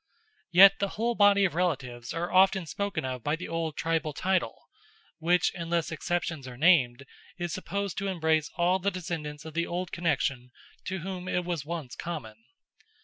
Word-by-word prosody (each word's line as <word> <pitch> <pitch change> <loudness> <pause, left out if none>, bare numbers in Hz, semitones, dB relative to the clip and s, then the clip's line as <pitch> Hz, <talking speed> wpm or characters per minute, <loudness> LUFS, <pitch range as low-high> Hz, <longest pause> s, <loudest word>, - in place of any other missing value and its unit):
Yet, 195 +2 +8
the 200 - +1
whole 235 +2 +1
body 205 -2 +5
of 180 - 0
relatives 130 -9 -2
are 170 +2 -3
often 190 -1 +5
spoken 200 -2 -3
of 130 -2 -4
by 145 +1 +1
the 180 - -7
old 165 -2 -3
tribal 160 -1 -1
title, 185 +4 -1 0.5
which, 175 +2 +2
unless 170 -1 -2
exceptions 160 -3 -2
are 125 -1 -9
named, 140 -5 +4 0.3
is 175 -2 -3
supposed 200 +1 -3
to 200 - -2
embrace 160 -4 +1
all 180 +2 +2
the 195 +2 +1
descendants 160 -5 -5
of 160 - -8
the 170 +2 -1
old 180 +1 -3
connection 140 -7 -1 0.4
to 185 -1 -3
whom 185 0 -5
it 180 -1 -1
was 170 -5 -3
once 160 -7 -5
common. 150 -11 -6
170 Hz, 170 wpm, -28 LUFS, 150-185 Hz, 0.5 s, Yet